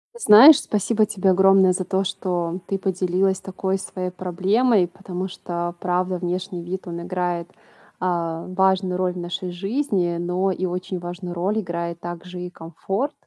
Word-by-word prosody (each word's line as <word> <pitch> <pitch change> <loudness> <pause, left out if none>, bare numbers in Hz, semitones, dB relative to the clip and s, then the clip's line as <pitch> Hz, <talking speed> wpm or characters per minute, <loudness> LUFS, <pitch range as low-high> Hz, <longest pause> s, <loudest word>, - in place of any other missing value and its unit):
Знаешь, 275 - +9
спасибо 215 +1 +1
тебе 195 -2 0
огромное 190 0 +5
за 185 0 -2
то, 190 +1 0
что 180 -2 -2
ты 195 - -1
поделилась 190 0 0
такой 190 0 -2
своей 185 -1 -5
проблемой, 190 +3 +2
потому 185 0 -6
что 175 -1 -4
правда, 180 0 0
внешний 180 0 -3
вид, 185 +3 -6
он 170 0 -5
играет, 175 -1 -2 0.5
а, 170 -2 -1
важную 190 0 +1
роль 185 -1 0
в - - -9
нашей 175 +1 -4
жизни, 195 -3 -1
но 180 +2 0
и 185 0 -2
очень 180 +1 -4
важную 175 +1 -6
роль 195 +5 0
играет 170 -1 -4
также 175 +1 -7
и 180 - -5
комфорт. 190 - -4
185 Hz, 155 wpm, -22 LUFS, 175-190 Hz, 0.5 s, Знаешь